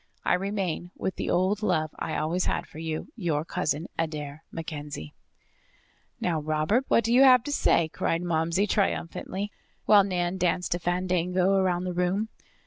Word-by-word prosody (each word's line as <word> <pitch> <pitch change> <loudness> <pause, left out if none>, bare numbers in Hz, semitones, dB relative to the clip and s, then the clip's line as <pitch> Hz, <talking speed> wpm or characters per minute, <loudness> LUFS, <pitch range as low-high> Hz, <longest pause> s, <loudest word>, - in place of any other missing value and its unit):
I - - +3
remain, 185 -2 -2
with 190 - -3
the - - -2
old 190 +4 +1
love 160 -7 +1
I 160 - -2
always 170 +4 0
had - - -1
for 155 - -12
you, 160 +4 -4
Your 165 -8 -1
cousin, 165 -3 -1
Adair 155 -1 -3
MacKenzie." 150 - -6 1.1
"Now, 165 -3 0
Robert, 155 - +1
what 230 - +3
have 230 - +2
you 255 0 +8
to 290 - -3
say?" 170 - +3
cried 165 +2 -1
Momsey 170 +3 +1
triumphantly, 200 0 -1 0.3
while 205 -2 +7
Nan 180 -1 -1
danced 180 0 +1
a 175 - -2
fandango 180 +1 +1
about 185 -2 +2
the 180 -1 -3
room. 180 +5 0
180 Hz, 155 wpm, -27 LUFS, 160-195 Hz, 1.1 s, you